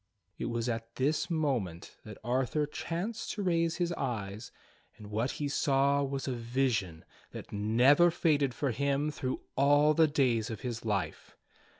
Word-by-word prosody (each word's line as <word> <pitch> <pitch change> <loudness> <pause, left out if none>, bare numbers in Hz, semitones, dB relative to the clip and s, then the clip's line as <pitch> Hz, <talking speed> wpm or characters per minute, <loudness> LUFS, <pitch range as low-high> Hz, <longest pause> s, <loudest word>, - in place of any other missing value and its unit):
It - - -2
was 115 0 -2
at 115 -1 -4
this 145 +6 0
moment 130 - -2
that 105 -2 -9
Arthur 130 +5 0
chanced 180 +9 -4
to 205 - -4
raise 170 -2 +1
his 175 -1 -1
eyes, 110 - -4 0.5
and 105 -1 -11
what 115 +5 -1
he 145 - -3
saw 140 -1 +2
was 135 0 -3
a 130 - -1
vision 115 -8 -1 0.3
that - - -8
never 125 +11 +4
faded 145 -6 +1
for 140 -3 0
him 140 +4 0
through 130 -3 -3
all 145 +2 +5
the 160 0 +5
days 125 -6 +1
of 110 -3 -6
his 120 -2 -4
life. 105 -4 -3
135 Hz, 160 wpm, -31 LUFS, 115-150 Hz, 0.5 s, all